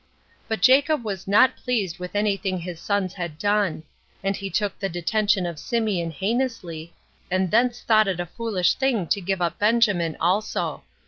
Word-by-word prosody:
But 220 -4 -3
Jacob 275 +2 +5
was 195 -3 -5
not 210 +6 +5
pleased 210 -10 -2
with 180 +2 -7
any 205 -1 +2
thing 190 -2 -3
his 175 -1 -6
sons 200 -1 -1
had 170 -5 -5
done; 205 -3 0 0.4
and 195 0 0
he 195 0 -5
took 205 0 -1
the 195 - -2
detention 195 +3 +1
of 170 -2 -4
Symeon 205 -3 -1
heinously, 190 - -3 0.4
and 185 0 0
thence 240 +2 +2
thought 215 -2 +4
it 185 -3 -1
a 175 - -1
foolish 190 -1 0
thing 255 -8 0
to 200 +4 0
give 190 0 -1
up 170 0 -2
Benjamin 205 -7 +2
also. 190 +6 0
195 Hz, 175 wpm, -24 LUFS, 175-220 Hz, 0.4 s, Jacob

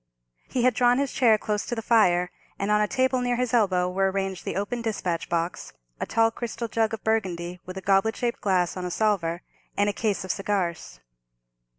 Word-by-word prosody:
He 250 - 0
had 255 0 +4
drawn 245 +2 +3
his 280 -1 0
chair 230 -4 +4
close 210 -1 -2
to 240 - -2
the 225 - -4
fire, 180 -6 +3 0.3
and 200 +1 -1
on 210 0 +4
a 210 - +2
table 260 0 +1
near 245 0 0
his 250 -1 -1
elbow 185 -6 +3
were 190 +1 +1
arranged 190 -1 -3
the - - -3
open 205 +5 -2
despatch 185 -8 -2
box, 170 +1 -2 0.3
a - - -3
tall 225 0 +3
crystal 235 0 -4
jug 225 0 0
of 220 - -17
Burgundy, 180 -5 -1
with 185 +1 -7
a - - -5
goblet 195 +3 +2
shaped 240 -1 -2
glass, 185 -3 +1
on 185 - -5
a 180 - -2
salver, 175 -4 0 0.3
and 205 0 +3
a - - -13
case 210 -2 -1
of 185 - -1
cigars. 175 - -2
205 Hz, 210 wpm, -26 LUFS, 185-230 Hz, 0.3 s, had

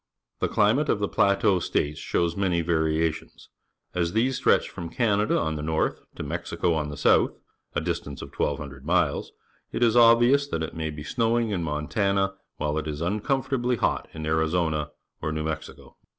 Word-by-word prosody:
The - - +1
climate 115 +9 +2
of - - +3
the 100 0 -1
P - - -1
late 100 0 +3
au 95 -3 +4
State 75 -3 0
^ - - -14
shows 85 +2 0
many 90 -4 +1
jvariatieias. 80 -1 -1 0.4
As 85 -1 0
these 125 +4 +2
stretch 130 - +3
from 85 -1 -7
Can 105 +2 +1
ada 105 - +1
on 80 -1 -1
the - - -4
north 80 +1 -1
to - - -5
iSIexico 85 -2 -1
on 75 -2 -1
the 75 - -7
south, - - +3 0.4
a - - +1
distance 70 -1 -4
of - - -11
1,200 70 -2 -3
miles, - - +1 0.4
it - - 0
is 115 -1 +4
obvious 120 +4 +6
that 80 -12 -2
it 80 - -5
may 80 -1 -2
be 75 -1 -7
snowing 115 +4 +1
in 95 -4 -1
Montana 95 +6 0 0.2
while 75 +1 -1
it 80 - -5
is 75 -1 -4
uncomfortably 125 - 0
hot 110 - 0
in 80 -1 -6
Arizona 80 -1 0 0.3
or 80 - -2
New 80 0 -2
Mexico. 80 0 -6
85 Hz, 190 wpm, -26 LUFS, 80-110 Hz, 0.4 s, obvious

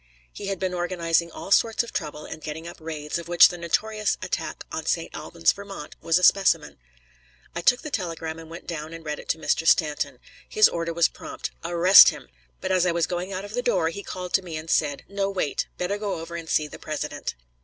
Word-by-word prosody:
He 200 - -7
had 195 -1 -2
been 185 0 -2
organizing 170 -1 0
all 195 - -9
sorts 225 +3 +4
of 235 - -10
trouble 150 0 -4
and 155 - -8
getting 155 +2 -6
up 170 - -9
raids, 155 0 -4
of 170 - -9
which 175 -1 +7
the 175 - -6
notorious 215 +5 0
attack - - -3
on - - -4
St. - - -1
Albans, 85 - +1
Vt., 200 -6 -9
was 165 0 +3
a 180 - -2
specimen. 195 - +3 0.8
I 170 - -2
took 245 +8 +3
the 305 - -6
telegram 165 -5 -3
and 160 -1 -11
went 170 +1 -9
down 160 -1 -5
and 165 -1 -11
read 150 -1 -3
it - - -12
to - - +1
Mr. 160 0 0
Stanton. 150 -4 +2 0.3
His 430 0 +6
order 170 0 -3
was 165 -1 +4
prompt: - - -7
"Arrest 175 +3 +8
him!" - - -8 0.3
But - - -2
as 185 -1 +3
I - - +3
was 170 -1 +1
going 180 +2 -4
out 195 +1 -4
of 205 - -10
the 245 - 0
door 180 -10 +1
he 200 +5 -6
called 180 -2 -7
to 190 - +4
me 170 -4 -6
and 160 +1 -5
said: 145 -2 +1
"No, 200 0 -1
wait; 185 -7 -1
better 195 +3 -2
go 205 -5 -2
over 165 +1 -7
and 165 -1 -6
see 155 - +2
the - - -11
President." - - -4
170 Hz, 230 wpm, -25 LUFS, 160-195 Hz, 0.8 s, Arrest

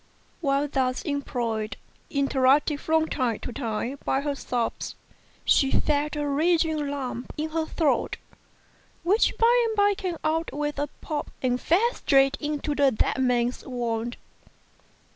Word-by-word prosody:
While 280 -2 +1
thus 260 -2 0
employed, 235 -8 -2 0.3
interrupted 280 +1 +3
from 320 0 +2
time 245 -8 0
to 245 - -6
time 240 +2 -3
by 270 - +1
her 290 0 -1
sobs, 245 -4 -3 0.5
she 270 - +4
felt 295 +2 +1
a 295 -1 -1
rising 315 0 +2
lump 260 -3 -4
in 310 +1 -2
her 320 0 -1
throat, 315 -4 0 0.9
which 400 +6 +3
by 475 +1 +4
and 445 - -2
by 410 0 +4
came 370 -3 -4
out 320 +1 0
with 295 0 -3
a 290 - 0
pop 300 -2 -3
and 250 -1 +1
fell 440 +9 +3
straight 275 -1 +3
into 295 0 -2
the 285 -1 +4
dead 260 +2 0
man's 245 -1 +1
wound. 240 -2 -3
285 Hz, 145 wpm, -26 LUFS, 255-315 Hz, 0.9 s, she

